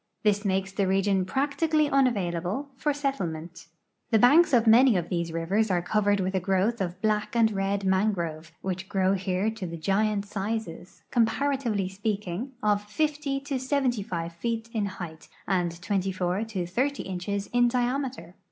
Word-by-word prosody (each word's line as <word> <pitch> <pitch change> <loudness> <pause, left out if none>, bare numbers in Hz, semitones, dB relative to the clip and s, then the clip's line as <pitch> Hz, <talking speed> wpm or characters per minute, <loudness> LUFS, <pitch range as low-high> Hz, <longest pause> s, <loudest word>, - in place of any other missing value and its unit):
This 205 -1 +2
makes 195 -1 0
the 195 0 0
region 195 0 +2
practically 295 - +1
unavailable 220 - 0
for 295 +3 0
settlement. 175 - -4 0.4
The 225 - +4
hanks 305 +8 +6
of 240 -3 +4
many 235 0 +6
of 170 -1 -3
these 170 -2 -1
rivers 190 +7 0
are 175 -2 +1
covered 205 +1 +2
with 190 0 -1
a 190 - +2
growth 195 +5 +1
of 180 -1 -3
black 215 +1 0
and 225 -2 +4
red 195 0 -1
mangrove, 175 -5 0
which 190 0 -4
grow 190 -1 +2
here 190 +2 0
to 220 -5 -6
the 170 0 -6
giant 200 +4 +1
sizes, 200 -3 -5
comparatively 235 -3 +1
speaking, 205 +4 -3
of 205 -1 +2
50 285 +4 -1
to 275 -2 -3
75 240 - -1
feet 230 +5 -3
in 210 -3 0
height 175 -4 -8 0.2
and 175 -3 0
24 185 +1 -1
to 210 -5 -3
ffO 255 +11 -1
inches 195 +2 -3
in 245 0 +4
diame 250 +2 0
ter. 180 -8 -12
200 Hz, 160 wpm, -27 LUFS, 185-240 Hz, 0.4 s, hanks